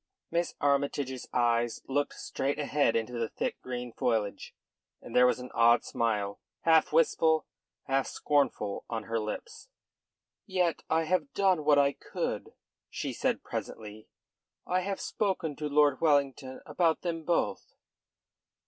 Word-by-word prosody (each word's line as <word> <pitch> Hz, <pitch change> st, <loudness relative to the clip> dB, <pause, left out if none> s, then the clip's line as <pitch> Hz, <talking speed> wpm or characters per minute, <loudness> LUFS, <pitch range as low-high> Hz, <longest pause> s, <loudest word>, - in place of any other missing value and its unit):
Miss 170 Hz, +1 st, -1 dB
Armytage's 140 Hz, -2 st, 0 dB
eyes 120 Hz, -1 st, +1 dB
looked 145 Hz, +2 st, -1 dB
straight 140 Hz, +2 st, -2 dB
ahead 145 Hz, -4 st, +1 dB
into 115 Hz, +2 st, -1 dB
the 115 Hz, -2 st, -2 dB
thick -, -, -3 dB
green 125 Hz, -2 st, -5 dB
foliage, 110 Hz, -4 st, -1 dB, 0.4 s
and -, -, -10 dB
there 125 Hz, 0 st, +7 dB
was -, -, +2 dB
an 125 Hz, 0 st, -8 dB
odd 115 Hz, +1 st, +5 dB
smile, 105 Hz, -3 st, -1 dB, 0.2 s
half 160 Hz, -1 st, +4 dB
wistful, 160 Hz, -, +3 dB, 0.4 s
half 135 Hz, 0 st, 0 dB
scornful, 135 Hz, -8 st, 0 dB
on 115 Hz, -2 st, -3 dB
her 115 Hz, +1 st, -2 dB
lips. 105 Hz, -1 st, -6 dB, 0.8 s
"Yet 180 Hz, -3 st, 0 dB
I 160 Hz, +1 st, +2 dB
have 185 Hz, -, 0 dB
done 190 Hz, -5 st, +3 dB
what 145 Hz, -1 st, +5 dB
I 140 Hz, 0 st, +4 dB
could," -, -, -4 dB, 0.3 s
she -, -, -4 dB
said -, -, -1 dB
presently. 105 Hz, 0 st, -6 dB, 0.6 s
"I 180 Hz, -, +1 dB
have 195 Hz, +1 st, -3 dB
spoken 185 Hz, -7 st, -1 dB
to 150 Hz, -1 st, -3 dB
Lord 145 Hz, -2 st, +3 dB
Wellington 140 Hz, -4 st, +1 dB
about 165 Hz, -3 st, +1 dB
them 165 Hz, -2 st, -2 dB
both." 170 Hz, +1 st, -1 dB
140 Hz, 140 wpm, -30 LUFS, 120-160 Hz, 0.8 s, there